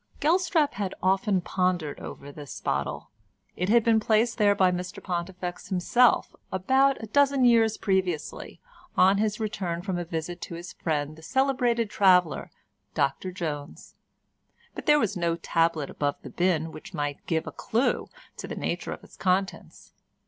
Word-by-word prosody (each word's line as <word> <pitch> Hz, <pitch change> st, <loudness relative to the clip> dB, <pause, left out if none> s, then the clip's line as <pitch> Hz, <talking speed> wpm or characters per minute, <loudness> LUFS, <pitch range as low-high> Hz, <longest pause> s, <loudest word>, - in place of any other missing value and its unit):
Gelstrap 330 Hz, -1 st, +2 dB
had 195 Hz, -2 st, -3 dB
often 190 Hz, +1 st, +2 dB
pondered 180 Hz, -5 st, -1 dB
over 140 Hz, +1 st, -9 dB
this 145 Hz, -1 st, -9 dB
bottle. -, -, -3 dB, 0.4 s
It 180 Hz, +2 st, -2 dB
had 235 Hz, +1 st, +5 dB
been 225 Hz, -1 st, +4 dB
placed 220 Hz, +2 st, +2 dB
there 205 Hz, -1 st, +5 dB
by 185 Hz, -2 st, +4 dB
Mr 180 Hz, +2 st, -4 dB
Pontifex 180 Hz, -1 st, -4 dB
himself 235 Hz, +7 st, +3 dB, 0.2 s
about 265 Hz, +9 st, +3 dB
a -, -, -2 dB
dozen 275 Hz, +2 st, +3 dB
years 225 Hz, -2 st, +4 dB
previously, 185 Hz, -6 st, -2 dB, 0.4 s
on 190 Hz, +2 st, +5 dB
his 210 Hz, 0 st, 0 dB
return 185 Hz, -6 st, -3 dB
from 185 Hz, -2 st, -2 dB
a -, -, -2 dB
visit 165 Hz, +1 st, -5 dB
to 170 Hz, -, -6 dB
his 170 Hz, +1 st, -8 dB
friend 150 Hz, -2 st, -2 dB
the 160 Hz, -, -14 dB
celebrated 245 Hz, 0 st, +1 dB
traveller 180 Hz, -6 st, +3 dB, 0.5 s
Dr 145 Hz, +5 st, 0 dB
Jones—but 155 Hz, -6 st, -9 dB
there 295 Hz, 0 st, +7 dB
was 215 Hz, -8 st, 0 dB
no 170 Hz, -2 st, 0 dB
tablet 165 Hz, -3 st, 0 dB
above 145 Hz, -1 st, -1 dB
the -, -, -9 dB
bin 165 Hz, -3 st, 0 dB
which 160 Hz, -, -10 dB
might 145 Hz, -2 st, -3 dB
give 160 Hz, -1 st, 0 dB
a -, -, -6 dB
clue 235 Hz, +4 st, -1 dB, 0.3 s
to -, -, -6 dB
the -, -, -5 dB
nature -, -, -3 dB
of -, -, -11 dB
its -, -, -16 dB
contents. 190 Hz, +1 st, -2 dB
185 Hz, 155 wpm, -27 LUFS, 170-220 Hz, 0.5 s, there